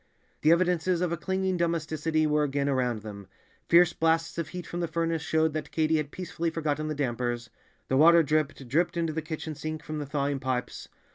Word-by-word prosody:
The 155 Hz, -, +5 dB
evidences 180 Hz, 0 st, +2 dB
of 180 Hz, -2 st, 0 dB
a -, -, +1 dB
clinging 190 Hz, +2 st, -1 dB
domesticity 160 Hz, -2 st, 0 dB
were 150 Hz, 0 st, +2 dB
again 140 Hz, -1 st, 0 dB
around 125 Hz, -5 st, 0 dB
them; 100 Hz, -3 st, -9 dB, 0.4 s
fierce 175 Hz, 0 st, +6 dB
blasts 165 Hz, +1 st, +1 dB
of 165 Hz, -, -2 dB
heat 180 Hz, +2 st, -7 dB
from 175 Hz, -, -5 dB
the 170 Hz, -, -1 dB
furnace 165 Hz, 0 st, -1 dB
showed 160 Hz, -1 st, +1 dB
that 155 Hz, -, -4 dB
Katy 160 Hz, 0 st, +1 dB
had 150 Hz, -2 st, -2 dB
peacefully 170 Hz, 0 st, -3 dB
forgotten 155 Hz, -2 st, -2 dB
the 155 Hz, -, -2 dB
dampers; 120 Hz, -3 st, -2 dB, 0.4 s
the 130 Hz, -, +1 dB
water 170 Hz, +3 st, +7 dB
dripped, 150 Hz, -2 st, -1 dB
dripped 170 Hz, +7 st, +1 dB
into 165 Hz, -2 st, 0 dB
the 160 Hz, -, -2 dB
kitchen 155 Hz, 0 st, -5 dB
sink 155 Hz, +1 st, -5 dB
from 155 Hz, 0 st, -5 dB
the 145 Hz, -, -5 dB
thawing 140 Hz, -1 st, -1 dB
pipes. 130 Hz, -1 st, -3 dB
155 Hz, 200 wpm, -28 LUFS, 145-170 Hz, 0.4 s, water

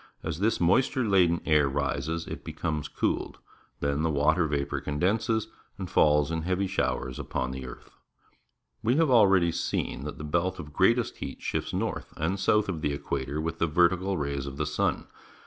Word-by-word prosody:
As 80 Hz, 0 st, -3 dB
this 110 Hz, +3 st, +1 dB
moisture 125 Hz, +7 st, +2 dB
laden 90 Hz, -4 st, +3 dB
air 75 Hz, -3 st, +4 dB
rises, 75 Hz, +3 st, -2 dB
it -, -, -7 dB
becomes 75 Hz, -2 st, -3 dB
cooled. -, -, -2 dB, 0.4 s
Then 70 Hz, +1 st, 0 dB
the 80 Hz, -, +1 dB
water 80 Hz, +3 st, +2 dB
vapour 70 Hz, -1 st, -2 dB
condenses 105 Hz, +10 st, 0 dB, 0.3 s
and 95 Hz, -, -5 dB
falls 75 Hz, -4 st, +3 dB
in 80 Hz, 0 st, -1 dB
heavy 90 Hz, +3 st, 0 dB
showers 65 Hz, -9 st, -2 dB
upon 65 Hz, 0 st, -3 dB
the 65 Hz, 0 st, -6 dB
earth. -, -, -11 dB, 0.9 s
We 120 Hz, +2 st, +2 dB
have 160 Hz, -2 st, +3 dB
already 95 Hz, -7 st, +5 dB
seen 70 Hz, -, -2 dB
that 75 Hz, -, -6 dB
the -, -, -7 dB
belt 85 Hz, +4 st, 0 dB
of 75 Hz, -4 st, -9 dB
greatest 115 Hz, +8 st, +2 dB
heat -, -, -7 dB
shifts -, -, -2 dB
north -, -, -3 dB
and 90 Hz, +6 st, -1 dB
south 105 Hz, +2 st, +3 dB
of 85 Hz, -5 st, -3 dB
the 75 Hz, -, 0 dB
equator 70 Hz, 0 st, -3 dB
with 80 Hz, +1 st, -3 dB
the 80 Hz, -, +2 dB
vertical 90 Hz, +4 st, +2 dB
rays 70 Hz, -2 st, -3 dB
of 70 Hz, 0 st, -7 dB
the -, -, -1 dB
sun. -, -, -1 dB
80 Hz, 180 wpm, -28 LUFS, 75-95 Hz, 0.9 s, already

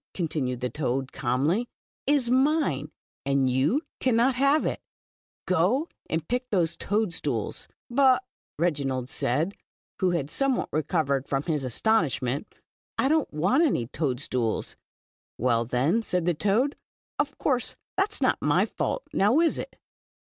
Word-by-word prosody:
" -, -, -76 dB
continued 140 Hz, -8 st, -2 dB
the 125 Hz, -, -1 dB
toad, 135 Hz, -2 st, -2 dB
calmly, 145 Hz, -, 0 dB, 0.4 s
•is 275 Hz, -5 st, +2 dB
mine, 295 Hz, +5 st, +2 dB, 0.3 s
and 135 Hz, -2 st, +2 dB
you 145 Hz, -, +2 dB, 0.2 s
cannot 255 Hz, +1 st, +3 dB
have 275 Hz, +4 st, +3 dB
iL -, -, -1 dB, 0.7 s
Go 195 Hz, -, +2 dB, 0.2 s
and 160 Hz, -1 st, -2 dB
pick 250 Hz, +1 st, -2 dB
those 175 Hz, -5 st, +1 dB
toad 210 Hz, -3 st, 0 dB
stools. -, -, -3 dB
" -, -, -24 dB
• -, -, -7 dB
But" 260 Hz, -2 st, +5 dB
said 255 Hz, -, -57 dB
Reginald, 135 Hz, -6 st, -1 dB, 0.9 s
who 185 Hz, -, +3 dB
had 165 Hz, -5 st, -1 dB
somewhat 275 Hz, -2 st, 0 dB
recovered 150 Hz, -3 st, 0 dB
from 135 Hz, 0 st, -1 dB
his 150 Hz, -4 st, -1 dB
astonishment, 140 Hz, -, +1 dB, 0.5 s
I 270 Hz, -, +2 dB
don 315 Hz, -1 st, +3 dB
t 150 Hz, -, -12 dB
want 190 Hz, -, +3 dB
any 250 Hz, -, +1 dB
toad 130 Hz, 0 st, -2 dB
stools." 125 Hz, -5 st, -2 dB, 0.6 s
•'Well, 115 Hz, -1 st, +1 dB
then," 140 Hz, -, +2 dB
said 180 Hz, -5 st, -1 dB
the 175 Hz, -, +3 dB
toad, 215 Hz, -, +1 dB, 0.4 s
"of 290 Hz, -1 st, -1 dB
course, 250 Hz, -4 st, 0 dB, 0.2 s
that 390 Hz, +2 st, +1 dB
is -, -, -4 dB
not -, -, +2 dB
my -, -, +3 dB
fault, -, -, -2 dB
now 210 Hz, +9 st, +4 dB
is 335 Hz, -1 st, +2 dB
it? -, -, -7 dB
175 Hz, 155 wpm, -26 LUFS, -, 0.9 s, But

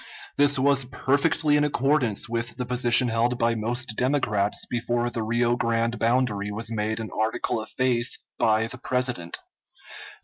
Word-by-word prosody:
This 145 Hz, 0 st, +3 dB
was 135 Hz, 0 st, +3 dB
perfectly 145 Hz, +4 st, +1 dB
in 145 Hz, -, +2 dB
accordance 135 Hz, -5 st, +1 dB
with 115 Hz, 0 st, -3 dB
the 125 Hz, -, -3 dB
position 125 Hz, 0 st, +4 dB
held 115 Hz, +2 st, 0 dB
by 115 Hz, -1 st, +1 dB
most 115 Hz, +1 st, -2 dB
Democrats 115 Hz, -7 st, 0 dB
before 120 Hz, 0 st, -2 dB
the 115 Hz, -, -3 dB
Rio 120 Hz, +2 st, +1 dB
Grande 115 Hz, 0 st, -1 dB
boundary 115 Hz, -4 st, 0 dB
was 110 Hz, +2 st, -3 dB
made 110 Hz, 0 st, -2 dB
an 110 Hz, -, -6 dB
article 110 Hz, +1 st, -1 dB
of 110 Hz, -, -9 dB
faith 125 Hz, -1 st, -1 dB, 0.2 s
by 110 Hz, 0 st, +2 dB
the 125 Hz, +2 st, -6 dB
President. 125 Hz, -10 st, -2 dB
120 Hz, 150 wpm, -25 LUFS, 115-130 Hz, 0.2 s, position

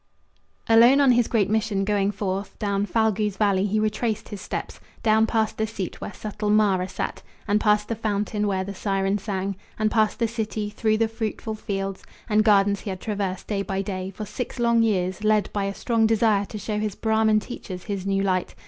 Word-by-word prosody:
Alone 235 Hz, +4 st, +7 dB
on 275 Hz, -2 st, +6 dB
his 240 Hz, -1 st, +3 dB
great 210 Hz, -5 st, +2 dB
mission 215 Hz, -2 st, 0 dB
going 200 Hz, -1 st, +1 dB
forth, 200 Hz, -1 st, -3 dB
Down 200 Hz, -1 st, -1 dB
Phalgu's 215 Hz, -1 st, +1 dB
valley 200 Hz, -2 st, +2 dB
he 215 Hz, +2 st, +1 dB
retraced 215 Hz, +1 st, -1 dB
his 205 Hz, -2 st, -7 dB
steps, -, -, -5 dB, 0.2 s
Down 220 Hz, 0 st, +4 dB
past 220 Hz, -1 st, 0 dB
the 220 Hz, -, +1 dB
seat 205 Hz, -5 st, -6 dB
where -, -, -5 dB
subtle 210 Hz, 0 st, -4 dB
Mara 200 Hz, -3 st, +3 dB
sat, -, -, -4 dB, 0.3 s
And 205 Hz, 0 st, +3 dB
past 210 Hz, 0 st, +3 dB
the -, -, -1 dB
fountain 210 Hz, -1 st, -1 dB
where 190 Hz, -2 st, 0 dB
the 200 Hz, +1 st, -6 dB
siren 195 Hz, 0 st, 0 dB
sang, 195 Hz, -1 st, -3 dB, 0.2 s
And 215 Hz, 0 st, +1 dB
past 215 Hz, -1 st, +2 dB
the 230 Hz, -, +1 dB
city, 220 Hz, -2 st, -3 dB
through 215 Hz, 0 st, +1 dB
the 225 Hz, 0 st, +2 dB
fruitful 220 Hz, 0 st, -4 dB
fields 195 Hz, -3 st, -4 dB, 0.2 s
And 215 Hz, -1 st, +3 dB
gardens 200 Hz, -2 st, +4 dB
he -, -, -6 dB
had 185 Hz, -1 st, -4 dB
traversed 200 Hz, -3 st, -3 dB
day 200 Hz, -2 st, -1 dB
by 195 Hz, 0 st, -2 dB
day 190 Hz, -1 st, -4 dB
For 210 Hz, +2 st, -7 dB
six 245 Hz, +5 st, -5 dB
long 235 Hz, -1 st, +3 dB
years, 190 Hz, -2 st, 0 dB
led 215 Hz, -1 st, +2 dB
by 200 Hz, -1 st, 0 dB
a 200 Hz, 0 st, -3 dB
strong 225 Hz, +1 st, +2 dB
desire 220 Hz, -2 st, +3 dB
To 215 Hz, -, -7 dB
show 210 Hz, +1 st, -3 dB
his 210 Hz, -2 st, -2 dB
Brahman 220 Hz, -1 st, +2 dB
teachers 190 Hz, -5 st, -8 dB
his 200 Hz, -3 st, -4 dB
new 195 Hz, 0 st, +1 dB
light. 185 Hz, -2 st, 0 dB
210 Hz, 200 wpm, -24 LUFS, 195-220 Hz, 0.3 s, Alone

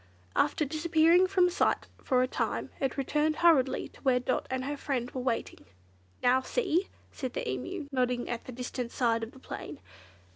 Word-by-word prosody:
After 305 Hz, -, +2 dB
disappearing 325 Hz, +4 st, +4 dB
from 365 Hz, -2 st, +3 dB
sight -, -, +1 dB, 0.2 s
for 255 Hz, -2 st, +3 dB
a -, -, +1 dB
time, -, -, -2 dB
it 270 Hz, -1 st, -1 dB
returned 300 Hz, +3 st, +1 dB
hurriedly 305 Hz, -6 st, +3 dB
to -, -, -19 dB
where 255 Hz, -2 st, +3 dB
Dot 255 Hz, +1 st, -1 dB
and 260 Hz, 0 st, -2 dB
her 290 Hz, +1 st, -2 dB
friend 260 Hz, -4 st, -2 dB
were 255 Hz, -, -4 dB
waiting. 245 Hz, -2 st, -2 dB, 0.6 s
"Now, 255 Hz, +1 st, +4 dB
see!" 375 Hz, -, 0 dB, 0.2 s
said 260 Hz, -3 st, -5 dB
the -, -, -3 dB
Emu, 130 Hz, -, -4 dB
nodding 250 Hz, -2 st, 0 dB
at 240 Hz, -1 st, -4 dB
the -, -, -7 dB
distant 250 Hz, 0 st, -4 dB
side 230 Hz, -2 st, +1 dB
of 225 Hz, 0 st, -5 dB
the -, -, -16 dB
plain. 265 Hz, -, -7 dB
260 Hz, 180 wpm, -30 LUFS, 250-310 Hz, 0.6 s, disappearing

